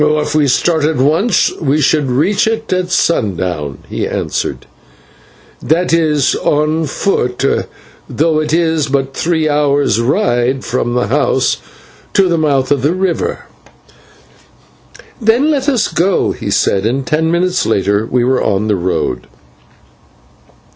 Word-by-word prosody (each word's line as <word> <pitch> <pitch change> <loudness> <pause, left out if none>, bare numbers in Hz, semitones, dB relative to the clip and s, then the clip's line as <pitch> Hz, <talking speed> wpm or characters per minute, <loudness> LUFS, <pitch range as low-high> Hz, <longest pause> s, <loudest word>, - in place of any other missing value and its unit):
"If 150 0 +1
we 150 -2 +2
start 160 +4 +1
at 155 +1 +1
once 160 - +2
we 150 0 +1
should 145 -1 +1
reach 175 +13 +1
it 225 -2 -2
at 185 -1 -1
sundown," 90 - -1
he - - -3
answered, - - -3 1.0
"that 165 +2 0
is 155 -4 +2
on 155 +2 0
foot, 125 -6 -1 0.6
though 155 0 +1
it 155 - -2
is 160 -2 +1
but 135 -1 -1
three 160 0 0
hours' 145 -6 +1
ride 130 - 0
from 120 0 -2
the 125 - +1
house 135 -1 +1 0.6
to 195 -1 +3
the 170 -2 0
mouth 140 -4 +1
of 140 -3 +2
the 145 +6 +1
river." 185 -2 -2 1.8
"Then 235 +8 +3
let 280 -1 0
us 250 -6 +1
go," 185 +3 +1
he - - -5
said, 95 -1 +1
and 130 +3 -2
ten 160 0 0
minutes 180 +2 0
later 100 +1 0
we 125 -1 +1
were 130 +1 +1
on 105 +1 0
the 105 - +1
road. 90 +1 -2
150 Hz, 140 wpm, -14 LUFS, 125-170 Hz, 1.8 s, to